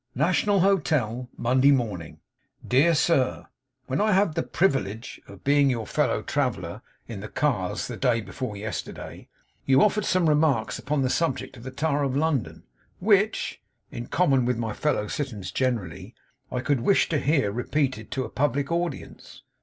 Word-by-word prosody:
'NATIONAL 185 - +2
HOTEL, 145 - +1
'MONDAY 130 +3 +3
MORNING. 110 - 0 0.5
'Dear 145 +7 +4
Sir 130 - +1 0.4
'When 135 +6 -1
I 215 -1 +3
had 195 -3 +3
the 165 - 0
privillidge 125 - -1
of - - -13
being 140 0 +4
your 115 -4 -1
fellow - - 0
traveller - - -2 0.3
in - - -6
the - - -6
cars, - - -1
the - - -6
day 120 -2 +2
before 110 -1 -6
yesterday, 105 +1 -6 0.4
you 135 0 +5
offered 210 0 +2
some 180 -3 +2
remarks 150 -6 +2
upon 140 +3 -1
the 130 - +1
subject 165 -5 -1
of 120 - -12
the 130 - -6
tower 145 +2 -1
of 135 -1 0
London, 150 -5 -1 0.4
which 210 +2 +1 0.3
(in 120 - -6
common 140 -8 +2
with 125 -1 0
my 115 -2 -2
fellow 150 -8 0
citizens 105 -9 -4
generally) 105 -5 -2 0.4
I 125 - -2
could 140 0 +1
wish 195 +11 +3
to 155 - +1
hear 140 -8 +1
repeated 125 -1 -1
to 130 0 -2
a - - -7
public 140 +2 -1
audience. 170 0 -4
135 Hz, 160 wpm, -25 LUFS, 120-160 Hz, 0.5 s, you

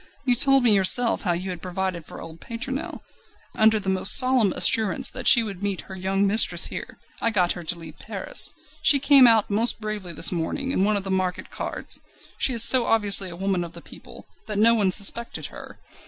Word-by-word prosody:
You 250 - +2
told 270 +2 +4
me 230 -3 +5
yourself 205 +5 +2
how 180 -4 -1
you 185 +2 -5
had 175 -2 -8
provided 185 -2 -5
for - - -11
old 165 0 -12
Pétronelle. 260 +5 -6 0.5
Under 220 0 +2
the 195 - -11
most 190 0 +4
solemn 255 -6 +3
assurance 220 -3 +1
that - - -5
she 235 - +6
would 200 -4 -8
meet 200 -2 -3
her 190 - -12
young 190 +2 -1
mistress 210 +3 +1
here, - - -7 0.2
I 230 - +1
got 185 -5 +1
her 175 - -6
to 175 - -3
leave 165 -2 -12
Paris. - - -1 0.3
She 300 -3 +4
came 275 -2 +5
out 225 -3 +3
most 225 +4 +2
bravely 215 -4 -5
this - - +1
morning 180 +10 -4
in 190 - 0
one 210 0 +1
of 200 - -3
the 195 - -6
market 185 -1 -3
carts. - - -6 0.4
She - - +1
is 230 -3 +4
so 250 -1 +3
obviously 200 -4 +2
a 170 - -9
woman 190 0 -2
of 170 - -10
the - - -11
people, - - -15 0.2
that 210 -2 -4
no 225 +3 +4
one 210 -4 +1
suspected 205 +5 +1
her. - - -12
205 Hz, 215 wpm, -23 LUFS, 185-230 Hz, 0.5 s, she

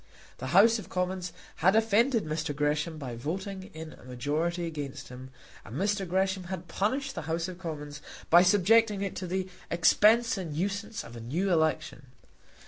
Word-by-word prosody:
The 130 - -4
House 210 - +5
of - - -10
Commons 180 -1 -2 0.3
had 185 +5 +4
offended 225 - +3
Mr. 155 -1 -2
Gresham 150 +2 0
by 130 -5 -6
voting 190 - -5
in 160 0 -8
a - - -16
majority 150 +8 -2
against 145 -4 -6
him, 130 +1 -9 0.3
and 110 - -10
Mr. 195 +1 0
Gresham 190 0 0
had 180 -1 -6
punished 265 +11 -1
the - - -4
House 165 +2 -1
of 185 -1 -8
Commons 150 -4 -6 0.3
by 175 +1 +9
subjecting 205 +2 +4
it 195 - -3
to 185 - -4
the 185 +1 -2 0.2
expense 220 +7 +4
and 165 -5 -5
nuisance 200 +4 -2
of 115 - -11
a - - -7
new 170 +12 -1
election. 155 -5 0
180 Hz, 170 wpm, -29 LUFS, 155-200 Hz, 0.3 s, by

